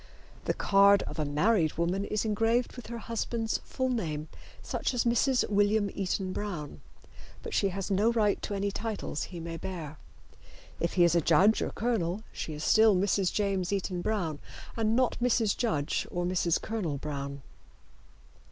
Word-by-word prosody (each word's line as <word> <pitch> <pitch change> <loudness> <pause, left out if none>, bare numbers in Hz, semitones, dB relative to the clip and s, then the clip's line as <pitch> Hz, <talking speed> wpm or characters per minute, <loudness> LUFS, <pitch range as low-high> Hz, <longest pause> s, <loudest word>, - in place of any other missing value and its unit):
The - - 0
card 200 0 +5
of - - -7
a 155 - +1
married 155 +3 +2
woman 175 +4 -1
is 215 +2 -1
engraved 225 +3 +1
with 245 - -9
her 235 +1 -5
husband's 230 0 -2
full 260 -1 -3
name, 155 -10 -2 0.3
such - - -2
as 240 - +2
Mrs. 245 +2 +2
William 205 0 +2
Eaton 190 -1 -2
Brown, 175 -8 -5 0.6
but 465 - -6
she 200 - +2
has 195 +2 -4
no 205 +4 +3
right 215 -3 +1
to 205 - -3
any 200 0 -1
titles 215 -7 -3
he 175 - -8
may 165 0 -5
bear. 160 -5 -6 0.8
If 170 - -1
he 180 - +4
is 170 -1 +4
a 170 - +3
judge 185 +8 +4
or - - -1
colonel 215 -4 -1
she 155 - -5
is 150 - -6
still 220 +2 +5
Mrs. 190 0 +1
James 195 -3 0
Eaton 190 -2 -2
Brown 175 -8 -1 0.4
and 225 -1 +1
not 255 0 +1
Mrs. 235 -4 +2
Judge 155 - -1
or 175 0 -2
Mrs. 175 -2 +1
Colonel 190 -10 -3
Brown. 140 -1 -5
200 Hz, 170 wpm, -29 LUFS, 170-220 Hz, 0.8 s, card